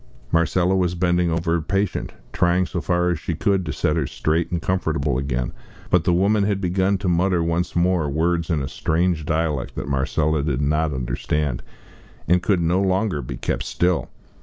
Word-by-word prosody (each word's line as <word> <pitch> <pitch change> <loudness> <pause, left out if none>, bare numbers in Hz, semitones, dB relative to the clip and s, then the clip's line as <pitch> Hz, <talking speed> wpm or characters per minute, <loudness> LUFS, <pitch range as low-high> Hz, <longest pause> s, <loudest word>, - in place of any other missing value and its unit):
Marcella 85 +3 +2
was 90 -2 +1
bending 90 0 +1
over 80 0 -1
her 85 0 +1
patient, 95 +4 -1 0.2
trying 90 +1 +2
so 85 -1 -4
far 90 0 +1
as 85 - -2
she 85 - -3
could 95 +2 +1
to - - -1
set - - 0
her - - 0
straight 80 +2 -1
and 85 - -1
comfortable 75 -7 0
again. 65 -2 -2 0.4
But 90 -2 +3
the - - +3
woman 100 +3 +3
had 100 -1 0
begun 95 +1 +1
to 95 - -4
mutter 90 0 +2
once 85 +2 -1
more 85 -3 +2
words 85 +3 0
in 75 -5 0
a - - -3
strange 80 +1 0
dialect 80 -4 -1
that - - -4
Marcella 75 +2 0
did 70 -3 -1
not 75 +2 +1
understand, 65 +1 -2 0.7
and 90 +1 +3
could 95 -1 +1
no 85 +3 +2
longer 95 -4 0
be - - -6
kept - - -2
still. 90 +5 0
85 Hz, 185 wpm, -22 LUFS, 75-90 Hz, 0.7 s, But